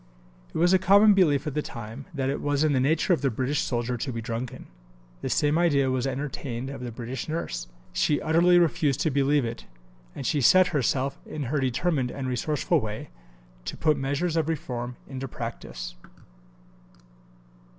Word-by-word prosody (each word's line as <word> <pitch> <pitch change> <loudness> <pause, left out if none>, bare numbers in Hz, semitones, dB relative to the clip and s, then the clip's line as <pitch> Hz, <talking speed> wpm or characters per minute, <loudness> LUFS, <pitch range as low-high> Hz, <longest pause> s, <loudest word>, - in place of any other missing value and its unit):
It - - -5
was 175 +3 +4
a 190 - +5
common 200 +3 +6
belief 160 -7 +3
of 150 - -3
the 150 - 0
time 115 0 -8
that 135 -5 -2
it 140 - -3
was 145 0 +1
in 155 -2 +3
the 130 - +2
nature 155 +7 +2
of 170 - 0
the 140 - +2
British 130 +5 -1
soldier 120 0 -1
to 130 +3 -3
be 115 - -4
drunken. 115 +1 -5 0.6
The - - -3
same 150 +2 +2
idea 140 -6 +3
was 130 0 0
entertained 135 -2 -4
of 135 -2 -7
the 125 -1 -5
British 120 +4 -5
nurse. 105 - -3 0.3
She 150 - +2
utterly 170 +3 +4
refused 150 -5 +2
to 155 - +1
believe 140 0 +2
it, 115 - -6 0.5
and 135 - -6
she 145 +1 +1
set 185 +9 +7
herself, 135 -1 0
in 150 - -4
her 140 +4 -1
determined 135 +1 0
and 130 +1 -4
resourceful 130 +4 +1
way, 105 - -6 0.5
to - - -5
put 155 -1 +3
measures 145 +5 -1
of 160 -1 +1
reform 125 -5 -3
into 135 0 -5
practice. 60 - -6
140 Hz, 180 wpm, -26 LUFS, 125-155 Hz, 0.6 s, set